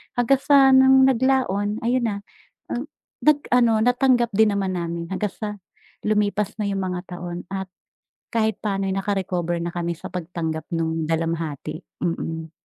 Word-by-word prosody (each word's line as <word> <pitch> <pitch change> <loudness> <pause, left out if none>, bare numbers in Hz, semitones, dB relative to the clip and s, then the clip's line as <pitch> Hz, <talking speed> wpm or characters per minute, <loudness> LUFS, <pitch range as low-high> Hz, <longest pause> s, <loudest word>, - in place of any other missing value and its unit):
Hanggang 245 +2 +3
sa 275 -1 +6
nung 265 0 +7
naglaon 250 -6 +1
ayun 240 0 +1
na, 205 - -1 1.1
nag-ano 250 -6 +3
natanggap 245 -1 +3
din 220 +1 +5
naman 190 -2 -1
namin 170 -1 -3
hanggang 205 +1 -1
sa 215 - -5 0.6
lumipas 210 -1 +1
na 205 - 0
yung 195 -1 -1
mga 180 -1 -2 0.2
taon 175 0 -7
at, 190 0 -3 0.7
kahit 220 -1 +1
pano'y 195 -2 -1
naka-recover 185 -3 -1
na 170 - -2
kami 170 0 -2
sa 165 - -9
pag-tanggap 165 -3 -4
nung 160 -1 -1
dalamhati, 165 -2 -2 0.2
mm. 160 -1 -3
195 Hz, 140 wpm, -23 LUFS, 170-235 Hz, 1.1 s, nung